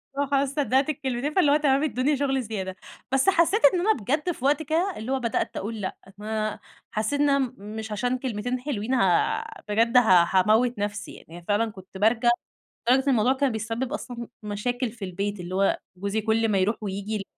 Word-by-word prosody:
اللي 285 - +1
هو - - -3
خلاص 275 0 +2
صدقت 275 0 +2
الكلمتين 270 0 -2
فاللي 300 -7 +4
هو - - +5
تمام 280 -1 +2
ادّوني 280 0 +1
شغل 270 -1 0
زيادة، 195 -4 -4 0.4
بس 270 +7 +3
حسّيت 380 +4 +3
إن 360 - +1
أنا 425 +5 +3
بجد 295 - -1
في 265 -6 -6
وقت 290 +3 +2
كده 330 +6 0
اللي 220 +4 -5
هو 270 - +1
بدأت 235 -2 -2
اقول 215 +1 -4
لأ، 185 - -3 0.2
ما 215 0 -3 0.3
حسّيت 220 +7 -1
إن 290 - +4
أنا 280 0 +3
م 260 -3 -1 0.2
مش 220 0 -6
عشان 245 +4 0
كلمتين 245 0 -3
حلوين 250 -3 -3
ها 195 - +2 0.3
بجد 230 +4 +3
ها 185 -8 +6
هاموّت 215 +4 +3
نفسي 205 0 -4
يعني، 170 +1 -12
فعلًا 215 +2 +1
كنت 190 -1 -12
بارجع 225 +3 +3 0.6
لدرجة 265 +2 +4
الموضوع 250 0 +3
كان 270 -1 +1
بيسبب 225 +3 -3
أصلًا 240 -2 -6 0.2
مشاكل 240 +4 -2
في 220 -3 -7
البيت، 200 +2 -3
اللي 180 +1 -5
هو 195 +1 +2 0.2
جوزي 200 +3 -2
كل 225 +1 +1
ما 200 - +2
يروح 195 +4 +2
وييجي 200 +1 -4
يل 205 - -3
235 Hz, 200 wpm, -25 LUFS, 210-270 Hz, 0.6 s, ها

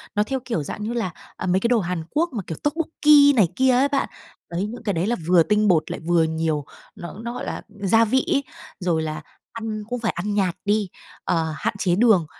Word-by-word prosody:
nó 210 - +3
theo 265 +4 -2
kiểu 200 - -2
dạng 210 - -6
như 225 +3 -3
là, 225 -7 -2 0.3
à, - - -4
mấy 185 +1 +2
cái 235 - +1
đồ 240 -1 +3
Hàn 175 -4 -3
Quốc 335 +3 +1
mà, 215 -5 -3
kiểu, 160 - -5
tokbokki 295 -2 +4
này 205 -6 +5
kia 260 0 +4
á 260 +3 +4
bạn. 280 -1 -1 0.4
Đấy, 175 +4 -1
những 235 +1 -8
cái 205 -3 0
đấy 170 +3 -1
là 240 - +1
vừa 175 -2 +6
tinh 210 +3 +2
bột 170 -5 +2
lại - - -4
vừa 170 -1 +4
nhiều 160 -2 -1 0.3
nó 175 - -8
nó 235 0 -4
gọi 245 - -5
là - - -4
gia 205 +2 +2
vị 260 +6 +1
ấy, 280 -1 +1 0.4
rồi 175 -4 0
là 155 -1 -4 0.3
ăn 220 -2 -4
cũng 245 0 -2
phải 225 -1 0
ăn 205 +4 -3
nhạt 190 -4 +1
đi, 205 -1 +1 0.3
ờ, 160 -2 0
hạn 230 +2 -1
chế 180 -2 +2
đường. 210 -5 +4
210 Hz, 235 wpm, -23 LUFS, 175-240 Hz, 0.4 s, vừa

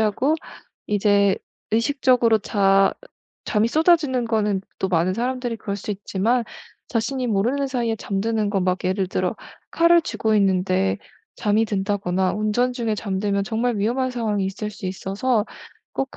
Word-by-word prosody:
하고 220 +8 +2 0.5
이제 200 -1 +3 0.3
의식적으로 235 -1 +3
자 195 -2 +3 0.5
잠이 215 +1 +1
쏟아지는 305 -4 +3
거는 210 -4 +1 0.2
또 190 - -1
많은 175 0 +2
사람들이 245 0 -2
그럴 200 -2 -4
수 205 - -6
있지만 210 +4 0 0.4
자신이 255 +2 -1
모르는 240 +7 +1
사이에 235 -4 -1
잠드는 210 +1 -1
건 195 -3 0
막 185 0 +1
예를 185 +1 0
들어 - - -1 0.3
칼을 335 0 +5
쥐고 220 -8 -1
있는데 185 - +2 0.4
잠이 215 +1 +2
든다거나 195 -3 0
운전 215 +4 0
중에 235 -3 -1
잠들면 200 0 -1
정말 230 +2 -1
위험한 250 +5 0
상황이 220 -5 -1
있을 210 +2 -4
수 195 -2 -7
있어서 200 +5 -1 0.5
꼭 270 0 -3
215 Hz, 310 characters per minute, -22 LUFS, 195-245 Hz, 0.5 s, 칼을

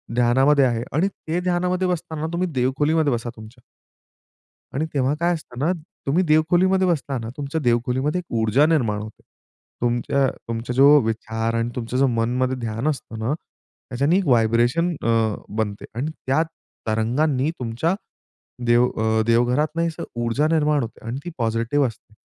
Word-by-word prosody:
ध्यानामध्ये 135 +4 +4
आहे 120 -2 0
आणि 160 +7 +2
ते 175 -3 -4
ध्यानामध्ये 180 +1 0
बसताना 160 -3 -3
तुम्ही 180 +2 0
देवखोलीमध्ये 145 +4 +1
बसा 120 0 -3
तुमच्या. 110 +3 -13 1.1
आणि 150 - 0
तेव्हा 135 0 +2
काय 170 +1 +2
असतं 145 -6 -9
ना 155 +7 +2 0.3
तुम्ही 155 +7 +2
देवखोलीमध्ये 175 +5 +3
बसताना 135 -9 -1
तुमच्या 145 +2 -3
देवखोलीमध्ये 125 +5 +1
एक 180 - -5 0.2
ऊर्जा 110 +7 +4
निर्माण 120 -11 +1
होते. 110 0 -11 0.6
तुमच्या 120 +3 +1 0.2
तुमचा 115 +1 -3
जो 140 +3 +7
विचार 115 0 -2
आणि 115 +1 0
तुमचं 120 0 -3
जो 135 +1 +4
मनमध्ये 125 +2 0
ध्यान 115 +2 -2
असतं 135 -6 -4
ना 110 +5 -1
त्याच्याने 150 +1 -2
व्हायब्रेशन 120 +6 +3
अ, - - -2 0.5
बनते 105 -2 -2
आणि 135 +7 -2 0.2
त्या 135 +5 +3 0.5
तरंगांनी 130 +6 +1
तुमच्या 125 +9 -1 0.7
देव 120 +1 +4
अ, 110 0 +1
देवघरातनं 130 +8 +2
असं 160 - -6 0.2
ऊर्जा 125 +6 +1
निर्माण 150 -3 +2
होते 115 -1 -8
आणि 120 +3 -3
ती 175 - -5
पॉझिटिव्ह 115 +4 +1
असते. 110 -2 -10
130 Hz, 145 wpm, -22 LUFS, 115-155 Hz, 1.1 s, जो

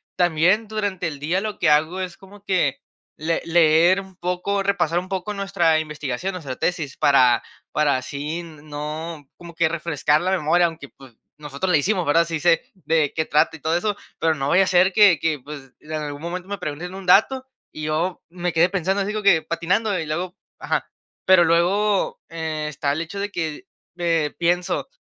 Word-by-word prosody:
también 175 +5 +2
durante 205 -4 -2
el 145 -3 -6
día, 165 +6 0
lo 210 0 -5
que 170 - +3
hago 155 +5 +2
es 180 -2 -5
como 200 +1 -16
que 175 -9 0 0.3
le 165 +2 -1
leer 170 +2 +4
un 190 -1 -15
poco, 180 +3 -2
repasar 175 -4 +1
un 185 - -8
poco 190 +2 -3
nuestra 195 -5 +1
investigación, 150 +2 -4
nuestra 145 -8 -6
tesis 160 -5 -2
para 130 -4 +4 0.3
para 150 -3 +2
así 145 +5 -4
n 160 -4 -11
no 150 +1 -6
como 170 -1 -11
que 160 -1 +1
refrescar 160 -2 +1
la 185 +1 0
memoria, 175 0 +3
aunque 160 -4 -9
pues 130 -4 -17 0.2
nosotros 150 +5 -3
la 160 - +5
hicimos, 180 +4 0
¿verdad? 165 +3 +3
Sí, 165 -1 -3
sé 170 -1 +3
de 160 -5 0
qué 160 - 0
trata 155 +2 +2
y 160 - -12
todo 160 +2 +1
eso, 210 +3 -1 0.2
pero 160 -1 +2
no 135 -1 -2
vaya 190 +3 +5
a - - -1
ser 185 +1 +4
que 205 -7 +6
que 155 -3 0
pues 135 -1 -10
en 155 - -13
algún 150 -1 -4
momento 180 +2 -5
me 200 - -3
pregunten 175 +4 -6
un 195 -1 -8
dato 255 +8 +4 0.3
y 155 - -8
yo 160 +4 -1
me 175 0 -3
quedé 165 +2 +4
pensando 190 +1 0
así 200 - -3
como 215 0 -3
que 185 -5 +5
patinando 185 +6 0
y 160 - -3
luego 175 +4 -3 0.3
Ajá, - - -2 0.4
pero 185 -2 +6
luego, 190 +5 +2
eh, 160 -2 -4
está 145 -1 -2
el 145 - -1
hecho 165 +4 -7
de 200 +1 -3
que, 160 -5 -4 0.3
eh, 165 -4 0
pienso 175 +1 0
170 Hz, 195 wpm, -22 LUFS, 155-185 Hz, 0.4 s, que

